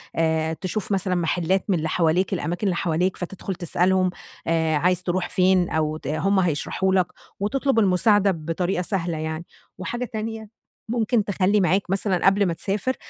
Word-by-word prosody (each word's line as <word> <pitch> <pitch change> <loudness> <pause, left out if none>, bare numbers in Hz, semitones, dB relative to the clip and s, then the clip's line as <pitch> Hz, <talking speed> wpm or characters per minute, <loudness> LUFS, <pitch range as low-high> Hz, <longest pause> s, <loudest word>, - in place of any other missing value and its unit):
آآ 160 -1 +1
تشوف 185 +6 -4
مثلًا 190 -1 +1
محلّات 175 +2 0
من 190 - +3
اللي 160 0 -2
حواليك 175 +4 +1
الأماكن 175 +2 -2
اللي 185 - +1
حواليك 175 +2 0
فتدخل 185 +1 -5
تسألهم، 185 +1 +1 0.7
عايز 180 +4 +1
تروح 175 0 -1
فين؟ 185 -1 +3
أو 155 -1 0
ت 145 - -9
هُم 190 +7 +1
هيشرحوا 185 +2 0
لك 185 -2 +3 0.3
وتطلب 265 +4 +1
المساعدة 200 0 +4
بطريقة 175 +2 -2
سهلة 175 -3 -2
يعني، 160 +1 -4 0.3
وحاجة 240 +7 -3
تانية 220 -1 -5 0.4
ممكن 230 -1 +1
تخلّي 200 0 +2
معاك 185 +2 +1
مثلًا 195 -1 0
قبل 200 +1 +4
ما 175 - 0
تسافر 205 +9 -2
185 Hz, 155 wpm, -23 LUFS, 170-200 Hz, 0.7 s, المساعدة